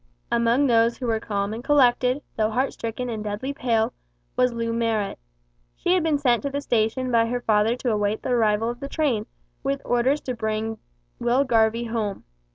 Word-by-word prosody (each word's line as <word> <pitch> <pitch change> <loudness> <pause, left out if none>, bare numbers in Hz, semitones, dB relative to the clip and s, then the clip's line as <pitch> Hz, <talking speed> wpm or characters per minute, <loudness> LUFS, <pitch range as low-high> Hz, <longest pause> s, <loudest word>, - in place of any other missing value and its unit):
Among 235 +4 +3
those 230 -2 +3
who 255 - -5
were 225 -2 +1
calm 205 -1 -2
and 230 +2 -6
collected, 260 -1 +3
though 215 -1 +1
heart 255 +5 0
stricken 230 +2 -4
and 220 -3 -4
deadly 215 +7 -3
pale, 230 -4 0 0.4
was 250 0 +3
Loo 230 -1 -2
Marrot. 225 -3 -1 0.6
She 355 - +1
had 370 - +3
been 315 -2 +2
sent 245 -5 +2
to 280 - -2
the 280 +1 -2
station 245 0 0
by 230 -1 +3
her 245 +1 -2
father 215 +1 +2
to 250 -1 -1
await 210 0 0
the - - -3
arrival 225 -2 +2
of 240 - -9
the 275 - -6
train, 260 -10 0 0.3
with 140 - -1
orders 250 +4 +2
to 255 - -3
bring 220 -1 -3 0.4
Will 245 +3 +2
Garvie 230 -2 +2
home. 220 -4 -3
235 Hz, 190 wpm, -24 LUFS, 220-255 Hz, 0.6 s, Among